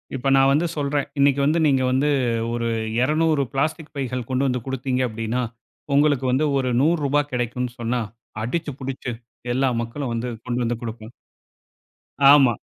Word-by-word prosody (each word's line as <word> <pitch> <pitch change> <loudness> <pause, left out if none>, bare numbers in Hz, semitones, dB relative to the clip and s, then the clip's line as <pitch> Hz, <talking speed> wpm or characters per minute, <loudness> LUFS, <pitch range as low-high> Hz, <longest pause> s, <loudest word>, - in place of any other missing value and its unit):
இப்ப 135 +1 -1
நான் 135 0 +5
வந்து 155 +5 +2
சொல்றன், 145 -1 0
'இன்னைக்கு 140 0 +4
வந்து 155 +3 +2
நீங்க 135 -2 +3
வந்து, 135 +3 +2 0.4
ஒரு 120 0 -1 0.3
200 155 +2 +2
பிளாஸ்டிக் 155 +3 -2
பைகள் 125 -3 -3
கொண்டு 130 +1 +1
வந்து 125 -1 -1
கொடுத்தீங்க 130 -1 -1
அப்படின்னா, 115 +3 -2 0.5
உங்களுக்கு 145 -2 +3
வந்து 140 +4 +2
ஒரு 130 -1 0
ரூ.100 145 -2 +2
கிடைக்கும்.' 125 0 -2
சொன்னா, 120 +1 -1 0.4
அடிச்சு 150 +5 -2
புடிச்சு 130 -1 -4 0.4
எல்லா 135 +1 +2
மக்களும் 120 +2 -4
வந்து 115 +2 -2 0.2
கொண்டு 125 +1 -1
வந்து 115 0 -2
கொடுப்போம். 115 0 -7 1.2
ஆமா. 135 -4 +6
130 Hz, 145 wpm, -23 LUFS, 125-145 Hz, 1.2 s, ஆமா